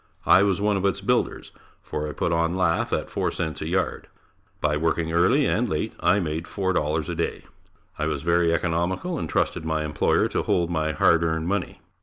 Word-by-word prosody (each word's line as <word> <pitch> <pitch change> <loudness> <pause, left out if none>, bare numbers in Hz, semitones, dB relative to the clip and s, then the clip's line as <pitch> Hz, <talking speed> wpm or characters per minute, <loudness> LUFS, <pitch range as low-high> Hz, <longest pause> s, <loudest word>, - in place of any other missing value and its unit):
I 95 - +6
was 100 -2 +2
one 105 0 +1
of 95 - -2
its 95 - -1
builders - - -1 0.3
for 75 0 -4
I - - -6
put 85 - -1
on 85 +2 +1
lath 85 -3 +1
at - - -1
4 - - 0
cents 80 -3 -4
a 80 - -3
yard. 90 +1 -1 0.5
By 75 0 +1
working 80 +1 0
early 105 - +3
and 120 0 +1
late, 75 - -2
I 100 - +3
made 80 -2 -3
$4 80 -6 -1
a - - -3
day. - - -3 0.6
I - - 0
was 70 - -3
very 85 0 +2
economical 85 - -1
and 80 - -4
trusted - - 0
my 80 -1 -1
employer 75 - +1
to - - -1
hold 85 -1 0
my 80 -2 0
hard 85 +3 +4
earned 80 0 -1
money. 100 -1 -2
85 Hz, 200 wpm, -24 LUFS, 80-95 Hz, 0.6 s, I